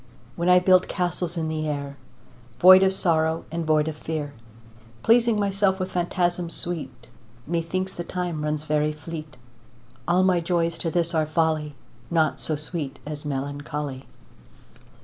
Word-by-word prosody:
When 170 +1 0
I 180 - +7
build 185 0 +4
castles 175 -1 -2
in 160 -1 -1
the 155 0 -2
air, 140 -1 -4 0.6
Void 185 +1 +9
of 190 0 +4
sorrow 160 -3 +1
and 165 -1 -3
void 155 -1 +3
of 160 - -3
fear, 150 -2 -4 0.7
Pleasing 230 -1 +4
myself 195 -1 +1
with 185 0 -3
phantasms 175 -1 -1
sweet, 175 -3 -5 0.4
Methinks 175 +4 -2
the 175 - -5
time 175 -3 -3
runs 150 0 -2
very 150 0 0
fleet. 155 -1 -8 0.7
All 180 +2 +3
my 185 -2 +3
joys 170 -1 -1
to 165 - -1
this 170 +1 0
are 155 -1 +1
folly, 155 -2 0 0.3
Naught 160 -2 +1
so 155 - -1
sweet 150 -2 -5
as 150 0 -6
melancholy. 145 -1 -4
165 Hz, 150 wpm, -24 LUFS, 150-180 Hz, 0.7 s, Void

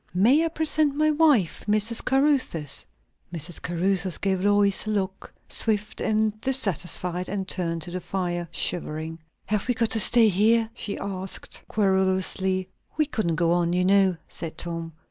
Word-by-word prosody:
"May 245 - +4
I - - +1
present 310 -2 +1
my 310 +1 +2
wife, 295 - +2
Mrs. 215 +2 +2
Caruthers?" 260 - +1 0.4
Mrs. 170 0 -3
Caruthers 180 +1 -1
gave 190 -2 -1
Lois 205 +1 +3
a - - -2
look, 195 -2 -3 0.2
swift 210 -1 -1
and 215 0 0
dissatisfied, 180 - -1
and 195 -1 -4
turned 170 -3 -2
to 175 - -4
the 185 +1 -5
fire, 175 -2 -3
shivering. 160 -1 -2 0.3
"Have 210 +1 -2
we 245 - 0
got 225 -1 0
to 225 - +4
stay 225 0 +7
here?" 220 +4 +2
she 215 -3 -4
asked 190 -1 -5
querulously. 190 -1 0 0.3
"We 305 - +3
couldn't 215 - -2
go 165 +1 +1
on, 175 0 +1
you 180 0 +1
know," 190 -2 +3
said 160 -1 -7
Tom. 165 -1 -4
195 Hz, 155 wpm, -24 LUFS, 175-220 Hz, 0.4 s, stay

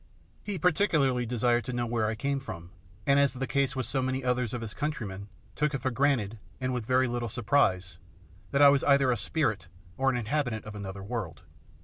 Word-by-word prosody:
He 205 -2 -4
particularly 150 - +2
desired 120 0 +1
to 125 - -4
know 120 0 -1
where 115 -2 0
I 110 - -1
came 140 +4 -1
from, 85 -9 -8 0.3
and, 140 0 +4
as 140 -2 +2
in - - -8
the 135 - 0
case 140 0 0
with 130 -2 -1
so 135 - -1
many 130 +1 -1
other 125 0 +1
of 125 - -4
his 110 -3 -6
countrymen, 105 -10 -4 0.3
took 150 -1 0
it 135 - -3
for 130 - +1
granted, 120 -5 +1 0.2
and 130 0 -1
with 120 -3 -3
very 130 0 +3
little 120 -1 -2
surprise, 95 -8 +1 0.5
that 140 +5 +3
I 140 - +10
was 140 -1 +3
either 140 -2 +4
a - - +2
spirit 110 - -1 0.3
or 135 0 +2
an 130 - 0
inhabitant 120 -1 -2
of 110 - -7
another 100 -1 -6
world. 100 -6 -5
125 Hz, 215 wpm, -29 LUFS, 110-140 Hz, 0.5 s, I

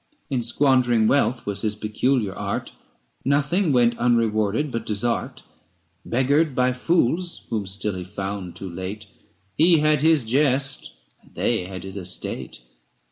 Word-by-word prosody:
In 130 -3 +1
squandering 120 -2 +3
wealth 130 -2 +1
was 100 -1 -2
his 105 -1 -1
peculiar 110 0 0
art; - - -4 0.5
Nothing 145 +6 +1
went 120 -2 +3
unrewarded 115 +2 +1
but 115 - -3
desert. 110 +3 -1 0.6
560 - - -12
Beggared 140 +4 +2
by 125 0 +2
fools 170 +5 0
whom 105 -4 -2
still 100 +2 -2
he 90 -1 -5
found 95 -1 -5
too 95 - -7
late, 95 +5 -6 0.5
He 165 +1 +5
had 150 -1 +3
his 160 -3 +4
jest, 135 - 0 0.3
and - - -24
they 90 - 0
had 95 -1 -7
his 95 +1 -7
estate. 90 -8 -5
120 Hz, 140 wpm, -23 LUFS, 100-140 Hz, 0.6 s, He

